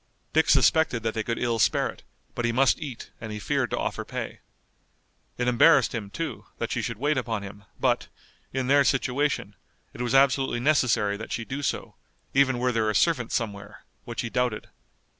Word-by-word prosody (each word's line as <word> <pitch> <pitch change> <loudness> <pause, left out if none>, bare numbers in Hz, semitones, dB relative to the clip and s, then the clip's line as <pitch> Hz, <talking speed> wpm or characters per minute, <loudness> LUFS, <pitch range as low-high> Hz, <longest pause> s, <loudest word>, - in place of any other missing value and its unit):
Dick 160 +1 +3
suspected 135 -3 +4
that 110 -1 -1
they 110 - -1
could 115 +1 -2
ill 120 -2 0
spare - - +3
it, - - -10 0.3
but 120 - -3
he 120 - +2
must 130 +3 +3
eat 135 -6 -7
and 110 -2 -6
he 105 - -4
feared 105 - -1
to - - -2
offer - - -2
pay. - - -6 1.0
It 125 - -1
embarrassed 125 +7 +5
him, 110 -4 -4
too, 165 +9 -5
that - - -3
she - - -1
should - - -4
wait 145 -1 +1
upon 115 -4 -3
him, 100 0 -10
but, - - +1 0.4
in 130 -1 -1
their 140 +2 +5
situation, 135 -6 0 0.4
it - - -7
was 120 +1 0
absolutely 135 -2 +3
necessary 120 -7 +2
that 110 - -8
she 115 - -3
do 140 +4 -4
so, 140 - -3 0.4
even 130 -2 +3
were 125 +1 +1
there 110 -2 +1
a 105 - -1
servant 140 -9 +2
somewhere, 100 -4 -4 0.2
which - - -4
he 120 - -4
doubted. 125 -4 -1
125 Hz, 195 wpm, -26 LUFS, 110-135 Hz, 1.0 s, embarrassed